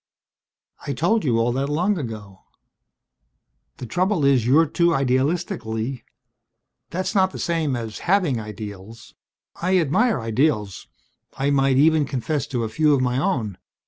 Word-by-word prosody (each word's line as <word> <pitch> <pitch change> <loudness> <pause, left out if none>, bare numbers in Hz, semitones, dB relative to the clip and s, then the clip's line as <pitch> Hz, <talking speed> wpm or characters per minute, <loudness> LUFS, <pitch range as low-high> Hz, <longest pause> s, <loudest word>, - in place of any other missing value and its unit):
"I 140 - -1
told 175 - +1
you 120 -6 +1
all 115 +1 +1
that 135 +3 -2
long 180 +6 0
ago. 105 -7 -7 1.4
The - - -7
trouble 180 - 0
is, 130 -4 +3
you're 155 +6 +5
too 170 +2 +1
idealistic, 135 +1 0
Lee. 110 +3 -4 0.9
That's 185 +2 -3
not 190 -3 +3
the - - -9
same 165 -6 -1
as 115 -3 -5
having 180 - +2
ideals. 105 0 -9 0.5
I 185 +2 +2
admire 175 - +2
ideals 115 - -1 0.5
I 140 +2 0
might 135 -1 +2
even 155 +1 +4
confess 135 +2 -2
to 120 -3 -2
a - - -1
few 150 +6 +2
of 130 - 0
my 125 0 0
own. 120 - -1
135 Hz, 145 wpm, -22 LUFS, 115-165 Hz, 1.4 s, you're